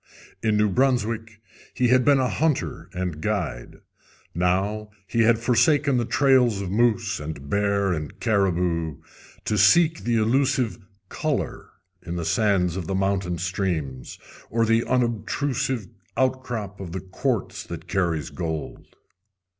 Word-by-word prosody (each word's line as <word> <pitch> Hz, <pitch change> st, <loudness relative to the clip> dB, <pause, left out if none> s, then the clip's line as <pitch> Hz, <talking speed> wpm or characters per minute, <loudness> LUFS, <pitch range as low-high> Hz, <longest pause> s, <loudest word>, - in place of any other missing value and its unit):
In 110 Hz, -1 st, +2 dB
New 105 Hz, 0 st, +3 dB
Brunswick 115 Hz, -1 st, 0 dB, 0.4 s
he 125 Hz, -1 st, +2 dB
had 125 Hz, +1 st, +5 dB
been 140 Hz, +1 st, +5 dB
a 130 Hz, -1 st, +2 dB
hunter 155 Hz, +2 st, -1 dB
and 90 Hz, -4 st, -4 dB
guide. 85 Hz, -, -3 dB, 0.5 s
Now 95 Hz, +5 st, 0 dB, 0.2 s
he 105 Hz, +5 st, -2 dB
had 115 Hz, 0 st, +5 dB
forsaken 125 Hz, +4 st, +3 dB
the 120 Hz, -, +1 dB
trails 130 Hz, -5 st, +3 dB
of 95 Hz, -2 st, -4 dB
moose 115 Hz, -2 st, +1 dB
and 75 Hz, -2 st, -7 dB
bear 100 Hz, -2 st, +1 dB
and 75 Hz, -3 st, -5 dB
caribou 90 Hz, -, 0 dB, 0.5 s
to 105 Hz, -, 0 dB
seek 160 Hz, -, +5 dB
the 120 Hz, 0 st, +1 dB
elusive 125 Hz, +2 st, +1 dB, 0.3 s
"color" -, -, -3 dB, 0.3 s
in 85 Hz, -1 st, -6 dB
the 85 Hz, -2 st, -3 dB
sands 95 Hz, -6 st, +2 dB
of 90 Hz, -4 st, -4 dB
the 95 Hz, -, -1 dB
mountain 95 Hz, -2 st, 0 dB
streams, 85 Hz, -8 st, -3 dB, 0.3 s
or 115 Hz, 0 st, +1 dB
the 115 Hz, +1 st, +3 dB
unobtrusive 125 Hz, -1 st, -1 dB, 0.3 s
outcrop 125 Hz, -6 st, -1 dB
of 90 Hz, -4 st, -7 dB
the 95 Hz, -, -4 dB
quartz 100 Hz, +4 st, -2 dB
that -, -, -8 dB
carries 85 Hz, -6 st, -1 dB
gold. 80 Hz, -3 st, -5 dB
105 Hz, 135 wpm, -24 LUFS, 90-120 Hz, 0.5 s, had